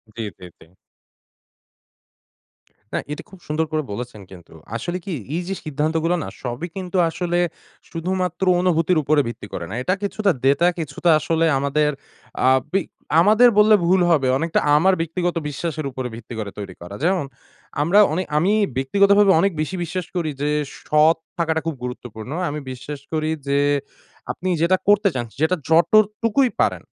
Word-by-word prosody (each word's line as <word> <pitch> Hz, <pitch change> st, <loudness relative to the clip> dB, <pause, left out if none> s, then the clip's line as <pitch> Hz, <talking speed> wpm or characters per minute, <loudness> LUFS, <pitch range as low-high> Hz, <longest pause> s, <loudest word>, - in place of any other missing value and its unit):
জি, 115 Hz, -, -5 dB, 0.2 s
জি, 90 Hz, -, -10 dB
জি। -, -, -16 dB, 2.3 s
না, -, -, +1 dB
এটা 150 Hz, -, -5 dB
খুব 190 Hz, -, -14 dB
সুন্দর 155 Hz, +1 st, 0 dB
করে 155 Hz, -1 st, 0 dB
বলেছেন 120 Hz, -1 st, -6 dB
কিন্তু। 90 Hz, -3 st, -14 dB, 0.2 s
আসলে 175 Hz, +10 st, -3 dB
কি? 190 Hz, -, -4 dB, 0.2 s
এইযে 180 Hz, +2 st, -3 dB
সিদ্ধান্তগুলা 155 Hz, +3 st, 0 dB
না, -, -, -6 dB, 0.2 s
সবই 125 Hz, +6 st, -4 dB
কিন্তু 185 Hz, -1 st, -4 dB
আসলে 175 Hz, +1 st, -1 dB, 0.5 s
শুধুমাত্র 180 Hz, +1 st, -2 dB, 0.2 s
অনুভূতির 175 Hz, -1 st, +2 dB
উপরে 145 Hz, +1 st, +3 dB
ভিত্তি 115 Hz, -3 st, -7 dB
করে 85 Hz, -, -4 dB
না। -, -, -6 dB
এটা 185 Hz, -, +1 dB
কিছুটা 200 Hz, 0 st, +1 dB
ডেটা 140 Hz, +6 st, +4 dB
কিছুটা 160 Hz, +2 st, -1 dB
আসলে 165 Hz, +2 st, +1 dB
আমাদের 150 Hz, +2 st, +1 dB, 0.6 s
আ -, -, +7 dB, 0.2 s
বিগ 195 Hz, -3 st, +1 dB, 0.4 s
আমাদের 215 Hz, +6 st, +6 dB
বললে 215 Hz, 0 st, +7 dB
ভুল 185 Hz, +1 st, +4 dB
হবে, 140 Hz, -5 st, +3 dB
অনেকটা 165 Hz, +2 st, 0 dB, 0.2 s
আমার 190 Hz, +5 st, +4 dB
ব্যক্তিগত 175 Hz, +2 st, -2 dB
বিশ্বাসের 155 Hz, 0 st, -4 dB
উপর 130 Hz, 0 st, -5 dB
ভিত্তি 115 Hz, +1 st, -10 dB
করে 105 Hz, -2 st, -4 dB
তৈরি 100 Hz, -3 st, -6 dB
করা। 90 Hz, +3 st, -8 dB
যেমন, 180 Hz, -3 st, +1 dB, 0.6 s
আমরা 175 Hz, +7 st, +4 dB
অনে 185 Hz, +4 st, 0 dB
আমি 180 Hz, +6 st, +3 dB, 0.3 s
ব্যক্তিগতভাবে 200 Hz, +8 st, +4 dB
অনেক 195 Hz, +4 st, +3 dB
বেশি 170 Hz, +5 st, -3 dB
বিশ্বাস 175 Hz, +2 st, -4 dB
করি 170 Hz, -3 st, -1 dB
যে, 145 Hz, -, +1 dB, 0.3 s
সৎ 155 Hz, +2 st, +4 dB, 0.2 s
থাকাটা 160 Hz, -1 st, 0 dB
খুব 165 Hz, -2 st, -2 dB
গুরুত্বপূর্ণ। 125 Hz, -1 st, -7 dB, 0.2 s
আমি 150 Hz, +1 st, -4 dB
বিশ্বাস 140 Hz, +3 st, -7 dB
করি 155 Hz, 0 st, 0 dB, 0.2 s
যে 140 Hz, 0 st, +2 dB, 0.7 s
আপনি 185 Hz, -, -4 dB
যেটা 185 Hz, +3 st, +3 dB
করতে 205 Hz, 0 st, +5 dB
চান, 120 Hz, -2 st, -2 dB, 0.2 s
যেটা 160 Hz, +3 st, +3 dB
যতটুকুই 215 Hz, +8 st, +3 dB
পারেন, -, -, 0 dB
165 Hz, 155 wpm, -21 LUFS, 140-185 Hz, 2.3 s, আ